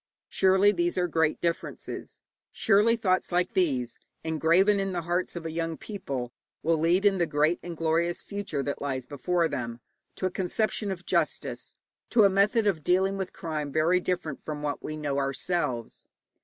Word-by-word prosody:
Surely 190 +2 +4
these 175 -2 -1
are 180 -1 +2
great 160 -2 +1
differences, 170 -1 -4 0.3
surely 220 +2 +4
thoughts 190 -6 0
like 180 +1 +1
these, 130 -10 0 0.2
engraven 165 +6 +3
in 195 -1 -1
the 175 -1 -2
hearts 175 +2 -1
of 170 -1 -6
a 160 - -3
young 165 0 -2
people, 135 - -5 0.3
will 165 +1 +2
lead, 175 +5 +2
in 195 -2 +4
the 170 - +2
great 155 +3 +2
and 175 -2 -7
glorious 165 +2 0
future 200 -9 -3
that 140 - -3
lies 135 -3 -2
before 170 +5 0
them, 120 -5 -4 0.4
to - - -3
a 185 - 0
conception 205 +3 -1
of 185 -2 -5
justice, 170 -4 -1 0.3
to 230 -3 +5
a 200 - +7
method 210 +4 +3
of 175 -7 +1
dealing 190 +3 +2
with 190 -1 -4
crime, 155 -3 -4
very 160 +5 +3
different 175 -5 -3
from 150 -1 -5
what 145 -1 -2
we 155 - -5
know 145 -2 -1
ourselves. 135 -3 -2
170 Hz, 175 wpm, -27 LUFS, 155-190 Hz, 0.4 s, a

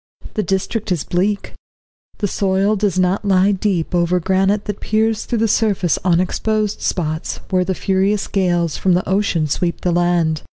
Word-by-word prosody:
The 215 - 0
district 200 +2 -2
is 175 -5 0
bleak, 200 +3 -1 0.6
the 205 - -1
soil 195 +2 +1
does 200 -3 0
not 185 +2 +1
lie 195 0 +3
deep 190 -4 -1
over 175 +1 +2
granite 190 +3 +1
that 205 -1 -4
peers 220 0 0
through 240 - -1
the 225 +1 +2
surface 200 -5 +1
on 175 -2 +3
exposed 215 +3 -1
spots, 155 -2 -2
where 185 -1 +3
the 185 +1 -2
furious 195 +2 0
gales 175 -5 0
from 185 -2 +2
the 180 - -1
ocean 190 -4 +1
sweep 170 +4 -2
the 180 - 0
land. 170 -3 +1
190 Hz, 170 wpm, -18 LUFS, 175-205 Hz, 0.6 s, lie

